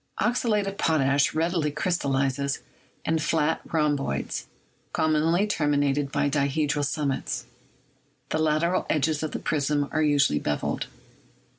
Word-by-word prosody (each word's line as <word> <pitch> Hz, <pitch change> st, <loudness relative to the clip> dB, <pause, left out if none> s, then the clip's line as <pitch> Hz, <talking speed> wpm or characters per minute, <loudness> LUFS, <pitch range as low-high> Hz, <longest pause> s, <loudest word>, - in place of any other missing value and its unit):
"Oxalate 215 Hz, -1 st, +1 dB
of 195 Hz, 0 st, -5 dB
potash 140 Hz, -3 st, +2 dB
readily 165 Hz, -1 st, +1 dB
crystallizes 140 Hz, -4 st, 0 dB, 0.5 s
in 160 Hz, 0 st, +1 dB
flat 155 Hz, 0 st, +1 dB
rhom 150 Hz, -2 st, +2 dB
boids, 135 Hz, -, -3 dB, 0.5 s
commonly 160 Hz, +4 st, +2 dB
terminated 145 Hz, -6 st, +1 dB
by 145 Hz, -, +1 dB
dihedral 145 Hz, +1 st, 0 dB
summits. 140 Hz, -1 st, -2 dB, 0.8 s
The 155 Hz, -, 0 dB
lateral 160 Hz, +3 st, +1 dB
edges 155 Hz, 0 st, +1 dB
of 155 Hz, -, -2 dB
the -, -, -3 dB
prism 145 Hz, -1 st, 0 dB
are 155 Hz, -, +1 dB
usually 145 Hz, -, +3 dB
beveled. 75 Hz, 0 st, -2 dB
150 Hz, 120 wpm, -26 LUFS, 140-160 Hz, 0.8 s, usually